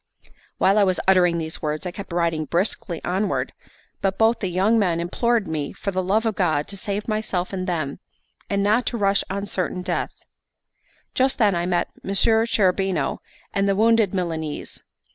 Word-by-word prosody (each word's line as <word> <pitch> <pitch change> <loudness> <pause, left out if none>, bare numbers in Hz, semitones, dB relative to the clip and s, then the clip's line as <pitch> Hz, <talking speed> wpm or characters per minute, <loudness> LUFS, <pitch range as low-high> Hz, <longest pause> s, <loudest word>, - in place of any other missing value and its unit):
While 195 +2 +4
I - - +6
was 185 -2 +1
uttering 180 -3 +4
these 160 -1 -4
words, 155 +2 -2
I 180 - -2
kept 195 0 -9
riding 170 -2 0
briskly 175 0 -1
onward; 190 +3 -1 0.5
but 195 0 0
both 225 +1 +3
the 195 - -1
young 195 +6 +2
men 175 -5 +1
implored 225 +5 0
me 155 -3 -3
for 200 - -4
the 185 0 0
love 205 +5 +1
of 220 - +1
God 160 -6 +1
to 200 - -5
save 200 +1 -3
myself 215 -4 -2
and 185 0 -3
them, 155 -6 -2 0.5
and 200 0 +1
not 215 +5 +2
to 240 - -1
rush 200 -2 +2
on 200 +1 -3
certain 180 -2 -2
death. 180 -1 -2 1.0
Just 260 +1 +2
then 210 -4 +4
I 175 0 -1
met 175 -1 0
Messer 220 +3 +2
Cherubino 190 -6 +1 0.3
and 195 0 +1
the 195 - +2
wounded 225 -1 +4
Milanese. 165 -5 -4
190 Hz, 180 wpm, -23 LUFS, 175-210 Hz, 1.0 s, I